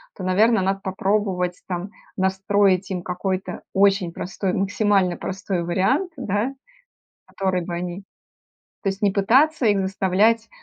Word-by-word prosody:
то, 185 - -8
наверно, 215 +4 +3
надо 195 +1 -1
попробовать 190 -2 -1
там 180 +3 -4 0.3
настроить 190 0 +2
им 180 - -2
какой-то 185 +1 -3
очень 195 -3 +3
простой, 190 +1 -3
максимально 195 -2 +1
простой 190 -2 -3
вариант, 200 - +1
да. 230 +2 -1 0.7
Который 185 -2 -1
бы 175 - -4
они 175 +1 -4 0.9
то - - -2
есть 195 +2 -5
не 200 -2 +3
пытаться 250 +9 +3
их 205 -2 +3
заставлять 195 +4 +2
195 Hz, 130 wpm, -22 LUFS, 185-205 Hz, 0.9 s, наверно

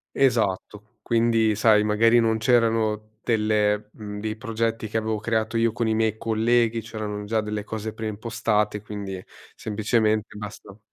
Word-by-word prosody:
Esatto. 110 -3 0
Quindi 115 -2 +2
sai 105 0 +4
magari 115 +3 +4
non 110 -1 +2
c'erano 110 -2 +1
delle 105 -2 +1
mhmm, 105 -1 -7
dei 110 0 -3
progetti 115 -1 -2
che 110 - -4
avevo 110 -1 -1
creato 110 +1 -1
io 115 -1 +2
con 115 +1 -1
i 110 - +1
miei 110 -1 +1
colleghi, 115 +1 +1
c'erano 105 -2 -5
già 110 +1 0
delle 105 -1 -3
cose 110 0 -5
pre 110 0 -6
impostate, 105 -1 -1
quindi 100 -3 -6 0.3
semplicemente 110 0 0
basta 105 0 -9
110 Hz, 150 wpm, -24 LUFS, 105-115 Hz, 0.3 s, sai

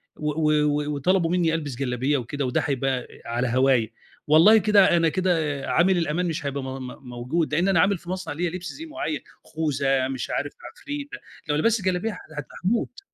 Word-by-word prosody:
و 150 0 -3
و 155 0 +1
و 150 0 0
وطلبوا 170 +3 +2
منّي 170 -3 +2
ألبس 150 -5 -3
جلابية 130 +2 0
وكده 130 +3 -3
وده 125 - 0
هيبقى 135 -2 -1 0.2
على 120 +2 -1
هواية، 125 -2 +2 0.4
والله 165 +9 +7
كده 200 -4 +5
أنا 165 -1 +3
كده 160 -6 0
عامل 185 +2 +3
الأمان 170 +1 0
مش 155 -3 -3
هيبقى 140 -1 -3
م - - -5 0.2
م 125 0 -11
موجود، 140 +7 -2
لإن 175 +5 +2
أنا 190 -4 +3
عامل 200 +2 +3
في 175 +1 -13
مصنع 185 -4 -4
ليّا 175 +3 -1
لِبْس 180 +1 -6
زِي 325 - -8
معيّن، 305 - -4 0.2
خوذة 135 -4 0
مش 130 -2 -4
عارف 145 - -2 0.2
عفريتة، 285 0 -7 0.3
لو 150 - +2
لبست 205 +5 +1
جلابية 185 +4 -1 0.5
هاموت. 235 - 0
155 Hz, 185 wpm, -24 LUFS, 135-180 Hz, 0.5 s, والله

